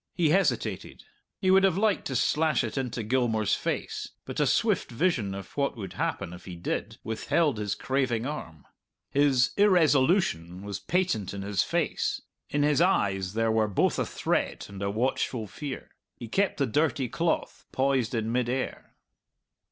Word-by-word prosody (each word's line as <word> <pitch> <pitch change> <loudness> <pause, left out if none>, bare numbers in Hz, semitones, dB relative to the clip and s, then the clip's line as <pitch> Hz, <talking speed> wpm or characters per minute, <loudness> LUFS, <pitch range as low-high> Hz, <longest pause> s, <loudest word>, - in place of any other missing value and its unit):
He 165 -4 +2
hesitated. 195 +3 0 0.3
He 185 -2 +2
would 190 0 +6
have 190 -2 +3
liked 210 -1 +1
to 130 - -3
slash 155 +4 +2
it - - -4
into 125 -3 -2
Gilmour's 110 -3 +1
face, - - -2 0.2
but - - -5
a - - +3
swift - - +2
vision 120 - 0
of 95 -2 -9
what 140 -3 0
would 95 -4 -6
happen 95 -1 -2
if 90 - -11
he 90 - -7
did 85 - -3
withheld 115 +4 0
his 105 -1 -1
craving 130 -1 0
arm. 85 - -6 0.5
His 135 -3 +3
irresolution 150 - +3
was 100 -1 -5
patent 110 - -1
in 100 - -5
his 100 -2 +1
face; - - -1 0.3
in 145 0 +1
his 150 +1 +3
eyes 95 - +1
there 115 0 +2
were 110 -1 +2
both 100 - +1
a - - +2
threat - - -1
and 100 -1 -9
a 100 - 0
watchful 115 +1 -1
fear. 135 - -7 0.2
He 120 - -8
kept 195 - +1
the 140 - +2
dirty 135 0 +1
cloth 165 +7 -2
poised 130 -3 +1
in 110 0 -1
mid 120 0 0
air. 130 +1 -4
125 Hz, 165 wpm, -28 LUFS, 105-150 Hz, 0.5 s, would